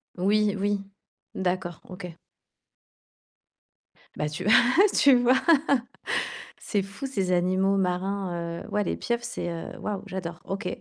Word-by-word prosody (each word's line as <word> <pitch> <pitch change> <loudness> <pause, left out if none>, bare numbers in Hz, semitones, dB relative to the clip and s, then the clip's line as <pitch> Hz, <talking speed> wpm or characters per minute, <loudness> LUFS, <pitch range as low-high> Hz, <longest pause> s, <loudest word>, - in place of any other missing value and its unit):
Oui, 205 +3 +2
oui. 205 +1 0 0.6
D'accord, 180 -2 -2
OK. 180 0 -7 2.1
Bah 150 - -1
tu 150 +4 -5
v - - +2
ah 245 +10 +6
tu 280 -3 +6
vois, 245 +1 +4 1.2
c'est 205 - -1
fou, 200 +7 -7
ces 195 -9 -1
animaux 185 +2 +2
marins, 180 -2 -2
heu, - - -11
ouais, 210 - +1
les - - -2
pieuvres, 235 0 -2
c'est 240 -7 -4
heu, 165 -1 -6
waouh, 205 -2 -3
j'adore. 175 -3 -5
OK. 195 +2 -4
195 Hz, 135 wpm, -26 LUFS, 180-210 Hz, 2.1 s, ah